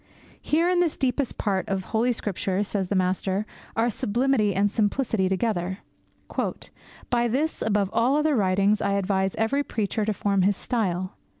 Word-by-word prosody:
Here, 330 +3 +2
in 360 0 +2
this 345 -3 +1
deepest 265 0 -1
part 195 -3 -1
of 195 -1 -1
Holy 230 +5 +1
Scripture, 200 -3 -1
says 200 -2 -2
the 200 - -1
master, 190 +2 0 0.3
are 230 +1 +2
sublimity 225 -1 +1
and 200 +1 +2
simplicity 215 -2 +1
together. 190 -2 -1 1.3
'By 240 -1 +2
this, 285 +7 -1
above 205 -3 +1
all 235 +5 +3
other 300 0 +2
writings, 200 0 +2
I 200 - +1
advise 190 -1 0
every 225 +6 +1
preacher 215 -3 -2
to 215 - +1
form 200 -1 +1
his 195 +1 +2
style. 185 -6 -2
210 Hz, 160 wpm, -25 LUFS, 190-240 Hz, 1.3 s, all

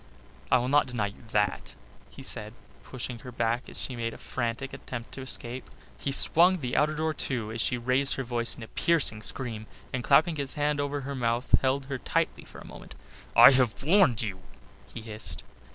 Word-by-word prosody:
"I 125 - +6
will 125 0 -1
not 145 +1 +3
deny 120 -5 -1
you 100 - -8
that," 105 -3 -1 0.3
he - - -12
said, 105 +2 -5 0.3
pushing 125 -1 -6
her 125 - -9
back 120 +1 -1
as - - -8
she 130 - -4
made 115 -1 -3
a - - -10
frantic 120 +2 -4
attempt 120 -2 -7
to 135 - -7
escape. 130 -1 -3 0.3
He 140 - -3
swung 175 +6 +4
the 125 -7 -3
outer 150 +1 +2
door 160 +1 0
to 120 -7 -3
as 115 0 -2
she 125 - +2
raised 130 +3 +1
her 135 - -3
voice 120 -1 0
in 120 - -8
a - - -8
piercing 145 -10 +1
scream, 110 0 -3 0.3
and 125 -2 -2
clapping 155 +5 +4
his 140 -1 0
hand 145 0 0
over 145 0 -2
her 140 +1 -5
mouth 120 -1 -1
held 135 +1 +1
her 135 -1 -4
tightly - - -1
for - - -13
a - - -11
moment. - - -11 0.4
"I 120 +3 +10
have 130 -3 +1
warned 150 - +4
you," 95 -4 -4 0.5
he - - -7
hissed. 110 -1 -4
125 Hz, 200 wpm, -28 LUFS, 115-140 Hz, 0.5 s, I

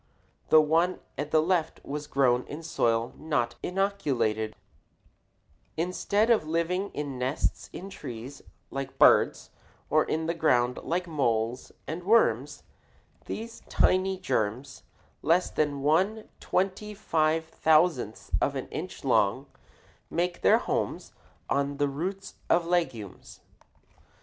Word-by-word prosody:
The 155 - +8
one 165 +4 +2 0.2
at 145 0 -4
the 155 0 +3
left 170 -1 0
was 150 +1 -5
grown 125 -2 +2
in 155 +3 -7
soil 115 -7 0
not 150 -7 -1
inoculated] 145 - -1 1.2
Instead 200 +6 +1
of 210 -9 +3
living 170 +5 0
in 140 -3 -4
nests 130 +3 -1
in 190 - -8
trees 125 -1 -8 0.3
like 135 -1 -5
birds - - +4 0.4
or 155 +1 +5
in 160 +1 -1
the 165 - 0
ground 125 -7 +2
like 180 +2 -1
moles 120 -6 -1
and 165 +3 -5
worms, 225 +5 +2 0.6
these 230 +1 -6
tiny 190 +1 +2
germs, 130 - -2 0.4
less 170 +4 +2
than 145 -2 -1
one 190 +9 +2
twenty 195 +3 -1
five 160 -4 +1
thousandth 155 - +1
of - - +1
an - - -4
inch - - -6
long, - - +2 0.6
make 175 0 -1
their - - +6
homes - - -3 0.3
on 140 0 0
the 145 0 +2
roots 185 +8 -5
of 170 0 +3
legumes. 165 - -3
155 Hz, 120 wpm, -28 LUFS, 135-180 Hz, 1.2 s, The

